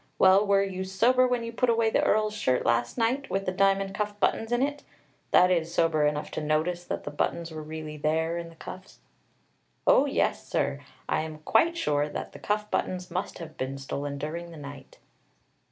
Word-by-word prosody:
"Well, 190 +2 +5
were 200 0 +4
you 190 -1 -3
sober 235 +7 +3
when 245 -2 0
you 230 - -5
put 250 +1 +1
away 230 -1 +3
the - - +3
Earl's 215 0 +2
shirt 130 -12 0
last 120 - +1
night, 250 +4 0
with 195 0 -1
the 185 - 0
diamond 195 +1 +2
cuff 205 0 -3
buttons 225 +2 +1
in 240 +2 +2
it, 285 +1 -2 0.5
that 180 0 +5
is, 170 -2 +1
sober 165 -3 +2
enough 150 0 -2
to - - -3
notice 155 +4 0
that - - -4
the 145 - -5
buttons 165 +3 -2
were 155 -1 -6
really 155 0 -7
there 160 +2 0
in 170 -1 -7
the 165 - -16
cuffs?" 185 +3 -10 0.9
"Oh, - - +5
yes, - - 0
sir. - - -1 0.3
I - - +1
am 155 -1 -6
quite 335 +10 +3
sure 145 - +1
that - - -5
the - - -12
cuff 210 0 -2
buttons 180 -1 -2
must 185 +3 -3
have 160 -2 -9
been 130 +1 -3
stolen 140 +1 -4
during 165 +4 -5
the 165 - -11
night." 140 -2 -10
180 Hz, 200 wpm, -27 LUFS, 155-210 Hz, 0.9 s, Well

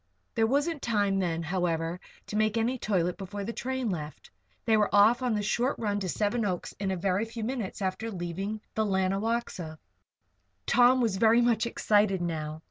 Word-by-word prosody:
There 225 -1 +2
wasn't 290 +4 0
time 205 -4 +1
then, 170 -3 -1
however, 170 -1 -1 0.3
to - - -6
make 215 +1 +2
any 240 +3 0
toilet 180 -5 0
before 200 +1 -5
the 230 +4 -4
train 260 -2 -2
left. 155 -4 -7 0.3
They 225 - +4
were 210 -1 +3
off 215 +5 +5
on 245 -3 +1
the 210 - -1
short 240 +6 0
run 205 -2 -1
to 190 -2 -3
Seven 215 +5 0
Oaks 185 -4 -3
in 195 -1 -1
a 190 - -1
very 185 +3 0
few 225 0 -6
minutes 225 -5 -3
after 190 +4 -2
leaving 195 +3 -4
the 220 - +1
Lanawaxa. 195 -3 -1 0.9
Tom 250 +1 +5
was 220 -5 +1
very 225 +3 +5
much 235 -1 +2
excited 205 -4 +2
now. 155 -3 -3
205 Hz, 180 wpm, -28 LUFS, 185-230 Hz, 0.9 s, off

